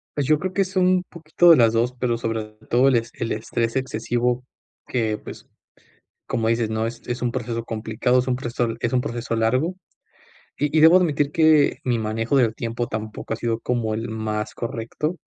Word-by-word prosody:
Pues, 145 -2 0
yo 155 +1 +3
creo 185 0 -3
que, 195 - +2
es 190 +1 -9
un, 185 0 +3
poquito 170 +1 +3
de 160 - +8
las 115 -2 +4
2, 120 +2 +1
pero 120 -2 0
sobre 115 -1 -2 0.2
todo 125 +3 +4
el 130 - +4
es 115 0 -1
el 115 - -4
estrés 115 +2 -2
excesivo, 125 0 -1 0.4
que, 110 -4 -1
pues, - - -11 0.8
como 115 -1 -1
dices, 115 -1 +1
¿no?, 110 +1 -1
es 115 0 -7
es 125 0 -4
un 120 -1 0
proceso 115 -2 -3
complicado, 115 +3 0
es 125 - -4
un 125 - +1
proceso, 120 -1 -2
es 115 - -1
un 125 - +3
proceso 120 -1 -3
largo. 130 +10 +1 0.8
Y 150 +2 0
y - - +5
debo 165 +3 +8
admitir 150 -5 +1
que, 155 -3 +4
mi 120 -2 +1
manejo 115 +4 -1
del 115 -4 +3
tiempo 115 0 -3
tampoco 110 +1 -5
ha - - -3
sido 115 -1 -1
como 115 -3 -1
el 115 +1 -3
más 110 -1 -3
correcto. 120 +8 -4
120 Hz, 200 wpm, -23 LUFS, 115-140 Hz, 0.8 s, de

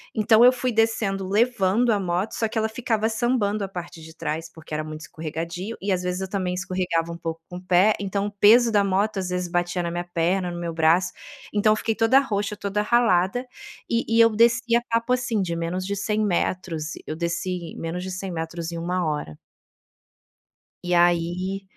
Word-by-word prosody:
Então, 220 +2 +5
eu 250 - +8
fui 255 0 -2
descendo 220 -4 0
levando 225 +1 +2
a 210 - +2
moto, 180 +3 -1
só 225 - 0
que 225 - -6
ela 220 0 +1
ficava 225 -1 -1
sambando 220 -3 0
a - - -2
parte 175 -3 -8
de 160 0 -12
trás, 160 +1 -4
porque 160 -1 -11
era 150 - -1
muito 155 0 -8
escorregadio 170 +7 -5
e 200 +1 -1
às 180 -1 0
vezes 180 +1 -2
eu 190 - -4
também 185 -2 -2
escorregava 180 -2 -1
um 170 - -6
pouco 165 -1 -5
com 180 - -7
o 180 - -9
pé, 185 +4 +4
então 200 0 -2
o - - -6
peso 225 +4 +5
da 205 -2 +3
moto 200 +2 0
às 185 - -3
vezes 180 -1 -2
batia 175 +1 -1
na 170 - -2
minha 175 +1 -3
perna, 175 +1 0
no 175 - -6
meu 170 -1 -4
braço. 165 +3 +3 0.4
Então 210 +1 +4
eu - - -2
fiquei 225 0 -1
toda 225 +4 +4
roxa, 210 -6 -2
toda 200 0 -2
ralada, 210 0 +2 0.4
e 235 0 +1
e - - +8
eu 230 - +7
desci 235 +1 +3
a - - -1
papo 230 +2 0
assim, 245 -4 0
de 175 -3 -2
menos 170 +3 -3
de 200 - -2
100 210 +1 -1
metros, 170 -4 -1
eu 155 - -3
desci 170 0 -3
menos 165 +2 -4
de 185 - -5
100 185 +1 -5
metros 165 0 -4
em 170 - -5
1 180 +2 -1
hora. 150 - -3 1.5
E 180 0 0
aí, 175 +3 +1
185 Hz, 205 wpm, -24 LUFS, 170-215 Hz, 1.5 s, eu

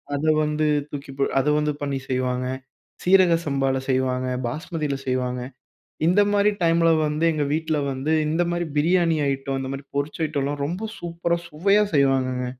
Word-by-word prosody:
அத 140 - -3 0.2
வந்து 150 0 0 0.3
தூக்கி 140 -1 -7
ப - - -3 0.2
அத 135 - 0
வந்து 150 0 0
பண்ணி 140 -1 -1
செய்வாங்க. 125 -1 -1 0.6
சீரக 185 -2 +5
சம்பால 135 -2 0
செய்வாங்க, 130 -1 0 0.2
பாஸ்மதியில 150 +1 -3
செய்வாங்க. 125 -1 -1 0.7
இந்த 180 +4 +4
மாரி 205 0 +4
டைமில 165 0 +3 0.2
வந்து, 150 +2 -1
எங்க 150 -2 0
வீட்ல 160 0 -1 0.2
வந்து 135 +4 -2 0.2
இந்த 160 +3 +1
மாரி 175 0 -1
பிரியாணி 165 +2 +3
ஐட்டம், 135 0 -2
இந்த 130 0 -4
மாரி 135 - -7
பொரிச்ச 145 +3 -2
ஐட்டம்லாம் 145 -1 -2
ரொம்ப 185 +8 -4
சூப்பரா, 170 0 -2
சுவையா 195 +7 +3
செய்வாங்கங்க. 130 -2 +2
150 Hz, 155 wpm, -23 LUFS, 135-170 Hz, 0.7 s, சீரக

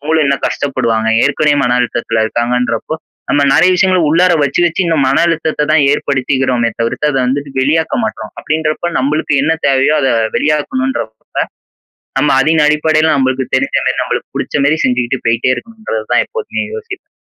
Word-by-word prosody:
அவுங்களும் 155 +1 +1
இன்னும் 140 0 -1
கஷ்டப்படுவாங்க. 115 -5 -1 0.2
ஏற்கனவே 145 +1 +2
மன 125 0 +1
அழுத்தத்தில 115 -2 -1
இருக்காங்கன்றப்போ, 120 +4 -1 0.3
நம்ம 145 - +2
நெறைய 175 +6 +4
விஷயங்கள 185 0 +2
உள்ளார 180 +3 +4
வச்சு, 140 +5 0
வச்சு 170 +3 -1
இந்த 165 -2 +1
மன 135 +3 +2
அழுத்தத்த 155 -2 -1
தான் 155 -1 +4
ஏற்படுத்திகிறோமே 130 -3 0
தவிர்த்து, 115 +6 0
அத 135 - 0
வந்துட்டு 140 +2 -3
வெளியாக்க 160 - +1
மாட்றோம். 110 - -5
அப்படீன்றப்போ, 155 +2 -2
நம்பளுக்கு 150 +3 0
என்ன 160 +3 +2
தேவையோ 135 +2 +3
அதை 135 -3 +1 0.2
வெளியாக்கணுன்றப்ப, 150 - -1 1.1
நம்ம 150 +1 +2
அதின் 155 +1 +2
அடிப்படையில 155 +1 +2
நம்பளுக்கு 130 -1 -1
தெரிஞ்ச 135 +1 0
மாரி, 130 - +1
நம்பளுக்கு 125 - -4
புடிச்ச 140 +1 -1
மாரி 155 +3 +2
செஞ்சுகிட்டு 125 0 0
போயிட்டே 115 +2 +1
இருக்கணுன்றது 215 - -6
தான் - - +3
எப்போதுமே 460 -2 -4
யோசிப்பேன். 440 -3 -8
145 Hz, 155 wpm, -14 LUFS, 130-160 Hz, 1.1 s, நெறைய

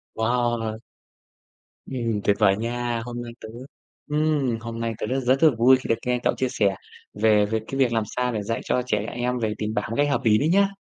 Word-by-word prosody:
Wow. 115 -1 0 1.1
Ừm, 115 -5 -2
tuyệt 100 - +3
vời 100 -2 +4
nha, 120 +1 -2
hôm 120 0 -5
nay 120 -1 -7
tớ 110 - -8 0.6
ừm, 150 -5 +1
hôm 115 0 -6
nay 115 0 -2
tớ - - -3
rất 130 +3 0
rất 130 +3 +1
là 160 - +8
vui 130 +3 +6
khi 130 - -8
được 115 - +4
nghe 125 0 +1
cậu - - +2
chia 130 - 0
sẻ 100 -5 +1 0.4
về 105 -1 +3
về 110 +1 -1
cái 135 - -4
việc 130 -3 +3
làm 115 -1 +1
sao 125 0 0
để 110 - -2
dạy 115 +3 -2
cho 125 - 0
trẻ 110 -4 0
em 125 +1 -2
về 110 -2 -1
tiền 110 0 -3
bạc 105 - -1
một 115 - -3
cách 145 0 +3
hợp 140 - 0
ý 105 -2 +4
đấy 150 - +1
nhé. 195 +2 +3
120 Hz, 230 wpm, -24 LUFS, 110-130 Hz, 1.1 s, là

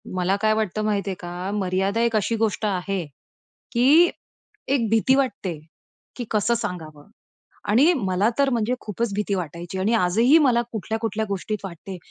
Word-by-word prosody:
मला 185 +1 +1
काय 215 0 +3
वाटतं 215 -1 -1
माहितीये 200 -2 -1
का? 175 +2 -5
मर्यादा 195 +2 0
एक 235 -1 +1
अशी 215 +2 +1
गोष्ट 220 -1 -1
आहे, 195 -2 -2 0.7
की 290 +9 +5 0.6
एक 250 -5 +1
भीती 225 +4 +3
वाटते, 205 - -1 0.6
की 245 - -5
कसं 215 +2 +2
सांगावं 170 -8 -6 0.6
आणि 275 +12 +5
मला 195 -4 +1
तर 280 -1 +4
म्हणजे 235 -1 0
खूपच 215 +1 -3
भीती 205 0 -1
वाटायची 175 +1 -5
आणि 205 +5 +1
आजही 230 - +4
मला 250 -6 +3
कुठल्या-कुठल्या 220 +1 -3
गोष्टीत 200 +2 -3
वाटते. 185 +1 -8
210 Hz, 150 wpm, -23 LUFS, 185-235 Hz, 0.7 s, की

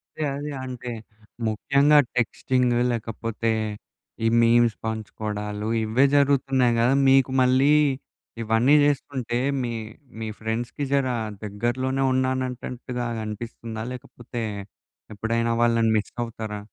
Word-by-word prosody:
అదే, 155 - -3
అదే. 145 +1 -5
అంటే, 125 -1 -6 0.6
ముఖ్యంగా 140 +7 +4 0.2
టెక్స్టింగ్ 125 +1 +1 0.2
లేకపోతే, 115 0 -2 0.7
ఈ - - +5
మీమ్స్ 115 -1 +4
పంచుకోడాలు 105 -1 -4 0.2
ఇవ్వే 115 +5 +3
జరుగుతున్నాయి 135 -3 +3
గదా! 120 +3 +3 0.2
మీకు 135 -1 +4
మళ్ళీ 130 +3 +4 0.7
ఇవన్నీ 115 +5 +3
చేసుకుంటే 130 -4 -1 0.2
మీ, 120 -1 -2 0.5
మీ 110 - -4
ఫ్రెండ్స్‌కి 115 +5 -3
జరా 130 -3 +1 0.3
దగ్గరలోనే 120 +6 -1
ఉన్నానంటంటుగా 125 -1 -2 0.2
అనిపిస్తుందా? 110 +1 -6
లేకపోతే, 120 -1 -7 0.7
ఎప్పుడైనా 115 +2 -1
వాళ్ళని 115 -1 +3
మిస్సవుతారా? 110 -1 -4
120 Hz, 95 wpm, -24 LUFS, 115-130 Hz, 0.7 s, ఈ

